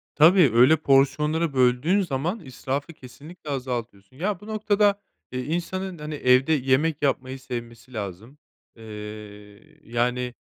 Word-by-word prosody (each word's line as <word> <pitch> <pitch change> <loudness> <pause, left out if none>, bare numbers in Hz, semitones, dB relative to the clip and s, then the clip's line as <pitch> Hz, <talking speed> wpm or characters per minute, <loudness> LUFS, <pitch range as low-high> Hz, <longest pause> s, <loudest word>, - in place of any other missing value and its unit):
Tabii, 165 0 +6
öyle 125 +7 +6
porsiyonları 150 +3 +2
böldüğün 130 +9 +3
zaman 170 +4 -2
israfı 140 +1 -5
kesinlikle 150 +4 -12
azaltıyorsun. 120 -5 -5
Ya, 190 +4 -2
bu 210 - -13
noktada, 205 -1 +1 0.3
eee, 125 - -2
insanın, 175 +3 -3
hani, 150 0 -6
evde 130 +1 +3
yemek 145 +2 +1
yapmayı 135 -1 -1
sevmesi 120 -1 -8
lazım, 110 +6 -7 0.4
eee, 115 - -13 1.0
yani, 125 +1 -1
135 Hz, 120 wpm, -24 LUFS, 125-165 Hz, 1.0 s, Tabii